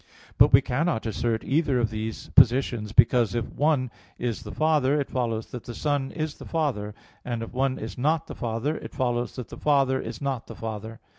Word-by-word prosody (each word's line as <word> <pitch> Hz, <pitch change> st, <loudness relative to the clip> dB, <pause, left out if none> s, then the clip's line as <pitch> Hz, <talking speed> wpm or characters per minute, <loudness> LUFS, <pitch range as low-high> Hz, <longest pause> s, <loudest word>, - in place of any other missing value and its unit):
But -, -, +7 dB
we 130 Hz, -, +8 dB
cannot 135 Hz, 0 st, -1 dB
assert 115 Hz, +1 st, -1 dB
either 140 Hz, -3 st, +1 dB
of 115 Hz, -2 st, 0 dB
these 110 Hz, 0 st, -5 dB
positions 120 Hz, -3 st, +4 dB
because 115 Hz, -1 st, +4 dB
if 115 Hz, -1 st, 0 dB
the -, -, -13 dB
one 140 Hz, -5 st, +1 dB, 0.3 s
is 120 Hz, -2 st, -2 dB
the 105 Hz, -3 st, -8 dB
Father, 150 Hz, 0 st, +2 dB
it 140 Hz, -, -3 dB
follows 115 Hz, -3 st, -2 dB
that 125 Hz, -, -7 dB
the 120 Hz, -, -7 dB
Son 145 Hz, -2 st, 0 dB
is 155 Hz, -1 st, -4 dB
the -, -, -9 dB
Father; 125 Hz, -11 st, -1 dB, 0.3 s
and 120 Hz, -2 st, -3 dB
if -, -, -8 dB
the -, -, -16 dB
one 135 Hz, -1 st, +1 dB
is 110 Hz, +2 st, -7 dB
not 155 Hz, +4 st, +1 dB
the -, -, -8 dB
Father, 120 Hz, +6 st, -2 dB
it -, -, -9 dB
follows 120 Hz, -2 st, -1 dB
that 125 Hz, -3 st, -6 dB
the -, -, -9 dB
Father 135 Hz, -3 st, +2 dB
is 115 Hz, +1 st, -6 dB
not 135 Hz, -4 st, -3 dB
the -, -, -9 dB
Father. 110 Hz, 0 st, -6 dB
125 Hz, 215 wpm, -26 LUFS, 115-140 Hz, 0.3 s, we